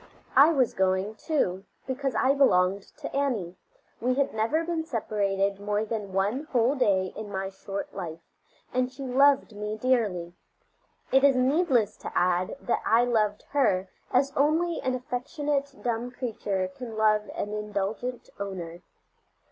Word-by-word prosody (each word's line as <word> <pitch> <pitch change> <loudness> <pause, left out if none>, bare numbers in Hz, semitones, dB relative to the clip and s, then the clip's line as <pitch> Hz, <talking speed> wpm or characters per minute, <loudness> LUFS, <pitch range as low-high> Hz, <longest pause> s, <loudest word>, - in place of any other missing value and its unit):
I 285 +5 +8
was 265 -6 +2
going, 190 +2 +1
too, 205 - -1 0.2
because 265 -1 -2
I 260 +5 +3
belonged 195 -8 +3 0.2
to - - -5
Annie; 235 -11 -1 0.4
we 250 +2 +1
had 280 0 +1
never 230 +10 +1
been 330 -1 -2
separated 200 -7 -1
more 205 +1 -1
than 210 -3 -4
one 205 +10 0
whole 245 +1 +3
day 195 -9 +1
in 210 -1 -7
my 190 0 -2
short 195 +1 -6
life, 170 -3 -6 0.5
and 255 0 +1
she 265 +1 -8
loved 265 -2 +3
me 210 +1 -4
dearly. 215 -9 0 0.8
It 265 +1 +5
is 280 -2 +6
needless 255 - +2
to - - -7
add 180 +5 +1
that - - 0
I 230 +2 +4
loved 215 -4 +1
her 195 -10 +2 0.2
as 275 +2 +2
only 320 +4 +2
an 255 0 0
affectionate, 280 +3 -2
dumb 240 0 -1
creature 210 -6 -2
can 230 -4 -7
love 215 -1 +3
an 210 - -3
indulgent 210 +4 -3
owner. 180 -4 -5
225 Hz, 150 wpm, -27 LUFS, 200-265 Hz, 0.8 s, I